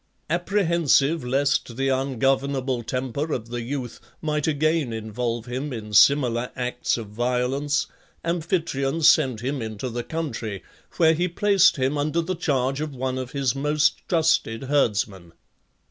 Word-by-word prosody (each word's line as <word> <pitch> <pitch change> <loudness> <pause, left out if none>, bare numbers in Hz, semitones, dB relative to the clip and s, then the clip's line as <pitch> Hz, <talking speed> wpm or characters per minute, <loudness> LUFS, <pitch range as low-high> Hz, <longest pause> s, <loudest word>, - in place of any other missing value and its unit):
Apprehensive 170 -5 +2
lest 135 -2 0
the 135 0 +1
ungovernable 135 0 0
temper 130 +5 -3
of 115 -4 -3
the 120 0 -4
youth 125 0 -5 0.2
might 150 -1 -1
again 155 -3 +1
involve 115 +1 -3
him 130 +4 -4
in 110 -3 -7
similar 125 0 +4
acts 125 -1 -1
of 110 -3 -7
violence, 125 +5 0 0.4
Amphitryon 165 -4 -1
sent 130 -7 +4
him 135 +1 -2
into 110 +2 -4
the 120 +1 -3
country, 120 - -4 0.3
where 160 -1 +5
he 175 +3 0
placed 195 +1 +4
him 135 +2 0
under 155 +3 0
the 175 +3 -2
charge 135 -4 0
of 155 -3 -4
one 130 0 -2
of 130 -1 -6
his 135 -4 0
most 150 +2 +1
trusted 160 -9 +1
herdsmen. 105 - 0
135 Hz, 140 wpm, -24 LUFS, 120-155 Hz, 0.4 s, where